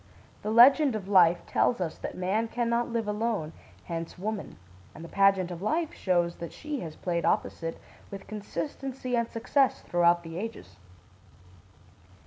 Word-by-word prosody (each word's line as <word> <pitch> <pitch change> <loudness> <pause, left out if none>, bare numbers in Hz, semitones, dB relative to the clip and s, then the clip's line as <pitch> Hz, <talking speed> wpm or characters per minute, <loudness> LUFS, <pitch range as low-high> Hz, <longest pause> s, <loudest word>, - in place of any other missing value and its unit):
The 210 - -3
Legend 255 +4 +6
of 200 -3 -5
Life 175 -3 +5
tells 240 - +1
us 170 -4 -3
that - - -6
man 195 +5 0
can 240 +1 -2
not 235 +1 0
live 230 -2 -1
alone, 210 -6 -2 0.3
hence 165 0 -5
woman; 210 +2 -4 0.4
and 160 - -9
the - - -8
Pageant 195 -1 +3
of 170 0 -7
Life 315 - -1
shows 175 -2 0
that 170 - -7
she 300 -2 -5
has 160 -7 -7
played 170 -2 -2
opposite 165 0 -1 0.3
with 195 -1 -8
consistency 255 +4 -4
and 235 -1 0
success 265 +4 +1
throughout 175 0 +2
the 165 +1 -6
ages. 225 +3 -7
205 Hz, 155 wpm, -28 LUFS, 175-235 Hz, 0.4 s, Legend